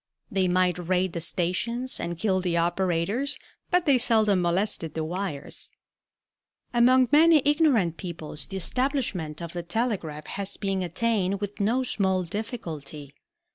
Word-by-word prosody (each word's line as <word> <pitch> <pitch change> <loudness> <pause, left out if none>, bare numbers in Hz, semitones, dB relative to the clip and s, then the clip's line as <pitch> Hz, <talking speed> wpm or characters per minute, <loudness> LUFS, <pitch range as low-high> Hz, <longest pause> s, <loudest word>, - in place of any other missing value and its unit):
They 190 -2 +2
might 180 -1 +2
raid 180 0 0
the 170 - -3
stations 200 +10 -1
and 170 0 -3
kill 190 0 +1
the 180 -2 0
operators, 185 - 0 0.3
but 360 0 +2
they 275 -4 +4
seldom 220 -6 +3
molested 175 -2 0
the 160 - -1
wires. 165 -3 -4 1.0
Among 250 +2 +5
many 310 -1 +6
ignorant 275 - +3
peoples 160 -4 -7
the 195 - -5
establishment 190 - -1
of 170 - -7
the 175 - -3
telegraph 170 -5 -2
has 200 0 -4
been 195 -2 -1
attained 195 +1 0
with 205 0 -5
no 230 +6 +2
small 190 -6 +1
difficulty. 165 - -6
190 Hz, 135 wpm, -26 LUFS, 170-235 Hz, 1.0 s, many